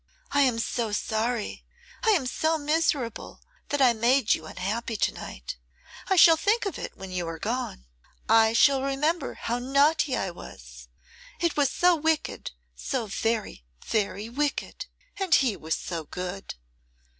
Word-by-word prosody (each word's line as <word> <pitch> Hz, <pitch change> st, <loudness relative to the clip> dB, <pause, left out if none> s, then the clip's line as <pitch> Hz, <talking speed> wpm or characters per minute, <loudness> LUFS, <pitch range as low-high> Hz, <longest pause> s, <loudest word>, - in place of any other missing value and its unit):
I 285 Hz, -, +3 dB
am 255 Hz, -4 st, +3 dB
so 230 Hz, -1 st, -2 dB
sorry, 220 Hz, +2 st, -2 dB, 0.4 s
I 450 Hz, -, +3 dB
am 360 Hz, -11 st, +3 dB
so 315 Hz, +5 st, 0 dB
miserable, 290 Hz, -6 st, -1 dB, 0.3 s
that 290 Hz, -1 st, +2 dB
I 245 Hz, -2 st, +6 dB
made 235 Hz, +1 st, +3 dB
you 160 Hz, -, -4 dB
unhappy 215 Hz, +6 st, -3 dB
to -, -, +1 dB
night. -, -, -8 dB, 0.5 s
I 385 Hz, -, +2 dB
shall 330 Hz, -2 st, +8 dB
think 415 Hz, +7 st, +1 dB
of 395 Hz, -, -4 dB
it -, -, -7 dB
when 190 Hz, -1 st, -8 dB
you 180 Hz, -2 st, -3 dB
are 165 Hz, 0 st, -5 dB
gone. 220 Hz, -, -3 dB, 0.4 s
I 225 Hz, 0 st, +5 dB
shall 270 Hz, +3 st, +5 dB
remember 295 Hz, +5 st, -1 dB
how 240 Hz, +1 st, -2 dB
naughty 280 Hz, +2 st, +2 dB
I 190 Hz, -, -2 dB
was. -, -, -12 dB, 0.5 s
It 340 Hz, -2 st, 0 dB
was 285 Hz, -3 st, +3 dB
so 355 Hz, +4 st, +3 dB
wicked, 320 Hz, -1 st, -1 dB, 0.3 s
so 240 Hz, -, -3 dB
very, 220 Hz, -, -2 dB, 0.2 s
very 210 Hz, 0 st, -1 dB
wicked; 285 Hz, +5 st, -3 dB, 0.3 s
and 380 Hz, -4 st, +3 dB
he 250 Hz, -6 st, +2 dB
was 160 Hz, -2 st, -2 dB
so 165 Hz, -3 st, -5 dB
good. 180 Hz, +4 st, -6 dB
240 Hz, 155 wpm, -26 LUFS, 205-295 Hz, 0.5 s, shall